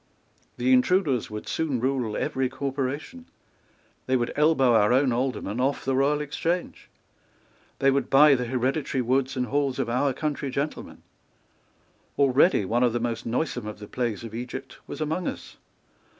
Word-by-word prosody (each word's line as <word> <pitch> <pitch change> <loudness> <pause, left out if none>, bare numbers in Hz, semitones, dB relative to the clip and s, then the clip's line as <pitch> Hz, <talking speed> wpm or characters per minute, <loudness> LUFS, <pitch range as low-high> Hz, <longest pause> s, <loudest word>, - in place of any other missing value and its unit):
The 125 +1 +2
intruders 135 - +2
would 105 0 -7
soon 150 -6 -1
rule 125 -4 -1
every 130 -1 -1
corporation. 140 - -4 0.8
They 130 0 +3
would 120 -1 -2
elbow 145 -5 +4
our 105 -1 +4
own 130 0 +3
Aldermen 120 -3 -2
off 135 +2 0
the 135 0 +1
Royal 145 +3 +2
Exchange. 165 +4 -3 0.9
They 135 0 +3
would 140 +1 0
buy 145 +2 +7
the 125 -2 0
hereditary 130 +2 -1
woods 130 +2 0
and 125 - 0
halls 140 +1 -1
of 125 -4 -2
our 135 +3 +1
country 145 +1 -3
gentlemen. 140 +3 -4 1.1
Already 140 - +4
one 115 +6 0
of 120 -2 +3
the 120 - 0
most 115 -1 -3
noisome 125 -2 -2
of 105 - -6
the 105 0 -10
plagues 120 -3 -3
of 115 -2 -8
Egypt 125 +3 -7
was - - -7
among 160 +4 -2
us. - - -7
130 Hz, 160 wpm, -25 LUFS, 120-140 Hz, 1.1 s, buy